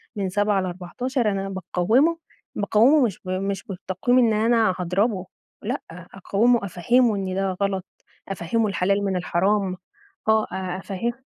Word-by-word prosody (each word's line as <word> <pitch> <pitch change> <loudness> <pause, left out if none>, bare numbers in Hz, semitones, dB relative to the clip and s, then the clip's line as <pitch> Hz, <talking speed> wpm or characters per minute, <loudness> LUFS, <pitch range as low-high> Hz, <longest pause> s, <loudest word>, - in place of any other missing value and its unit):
من 195 -2 -2
7 205 0 +1
ل14 210 +7 -2
أنا 195 0 -3
باقوّمه 205 - +1 0.4
باقوّمه، 225 +8 +4
مش 200 -6 -3
ب 185 - -6
مش 195 +1 -2
بالتقويم 195 +4 -1
إن 230 -3 +4
أنا 220 -2 +3
هاضربه، 190 +2 0 0.4
لأ، 245 +6 -3
أقوّمه، 200 +6 0
أفهمه 225 +5 +2
إن 190 -1 -3
ده 190 -1 -1
غلط، 190 -2 -1 0.4
أفهمه 195 +5 0
الحلال 195 +1 0
من 190 -1 0
الحرام، 185 +2 0 0.5
آه، 220 0 +4
أ 185 -1 -3
أفه 200 +5 -3
195 Hz, 140 wpm, -23 LUFS, 185-225 Hz, 0.5 s, باقوّمه